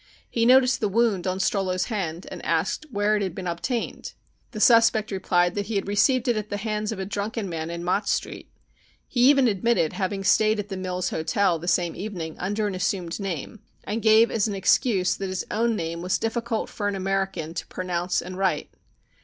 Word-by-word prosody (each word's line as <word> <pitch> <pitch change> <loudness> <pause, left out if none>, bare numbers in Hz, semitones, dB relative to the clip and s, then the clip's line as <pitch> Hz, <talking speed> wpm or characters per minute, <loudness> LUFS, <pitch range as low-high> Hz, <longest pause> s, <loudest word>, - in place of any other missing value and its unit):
He 230 0 +2
noticed 255 0 +5
the 210 - 0
wound 205 -4 +1
on 185 0 -1
Strollo's 190 -1 0
hand 180 -6 -3
and - - -8
asked 310 - -1
where 210 -2 +1
it 210 - 0
had 185 -3 -3
been 190 - -6
obtained. 180 +8 -3 0.4
The 215 - -7
suspect 225 -1 +5
replied 175 -2 +1
that 205 -1 -3
he 225 - -3
had 195 - -1
received 235 +6 +2
it 240 - +3
at 215 0 -4
the 205 - -2
hands 215 0 -2
of 220 - -4
a 190 - -3
drunken 205 +2 -3
man 165 -2 -4
in 170 0 -5
Mott 185 +4 0
Street. - - -3 0.6
He 250 +1 +4
even 275 -3 +5
admitted 210 -5 +1
having 195 0 -2
stayed 215 +3 +3
at 205 0 -4
the 195 - -4
Mills 185 -1 -3
Hotel 170 +1 +1
the 175 - -8
same 175 -1 +1
evening 180 -6 -5
under 205 +4 -1
an 205 - -2
assumed 180 -1 -2
name, 195 +2 -5 0.2
and 220 +3 -3
gave 220 +1 +5
as 225 -1 +1
an 205 - -3
excuse 195 -1 +2
that 195 -1 -4
his 185 0 -3
own 230 +1 +1
name 170 -3 -4
was 180 +1 0
difficult 225 0 -2
for 205 - -4
an 205 - -1
American 190 -4 -2
to 170 - -5
pronounce 180 -1 -2
and 185 +1 -7
write. 185 -6 0
200 Hz, 205 wpm, -25 LUFS, 180-220 Hz, 0.6 s, noticed